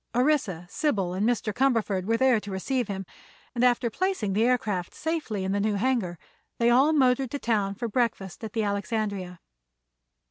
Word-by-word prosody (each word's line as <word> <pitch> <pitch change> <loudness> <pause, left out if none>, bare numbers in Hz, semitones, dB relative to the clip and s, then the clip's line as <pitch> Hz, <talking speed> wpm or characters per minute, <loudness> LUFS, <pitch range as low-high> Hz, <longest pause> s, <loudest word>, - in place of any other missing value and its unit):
Orissa, 245 - +1
Sybil 200 - -1
and 205 +5 +1
Mr. 225 -3 -1
Cumberford 225 -8 +1
were 225 +2 +1
there 255 -2 +4
to 205 - -9
receive 235 +5 -1
him, 195 -1 -4 0.5
and 245 0 0
after 245 -1 +3
placing 370 - -1
the 215 +3 +2
aircraft 215 -8 0
safely 305 - -2
in 190 - -1
the 200 - 0
new 210 0 +1
hangar 205 -6 0 0.4
they 235 0 +3
all 270 +6 +5
motored 260 -3 +3
to 285 - -3
town 210 -6 0
for 235 +3 -3
breakfast 225 -3 -2
at 220 - -6
the 225 - 0
Alexandria. 200 -3 -2
225 Hz, 175 wpm, -26 LUFS, 200-250 Hz, 0.5 s, all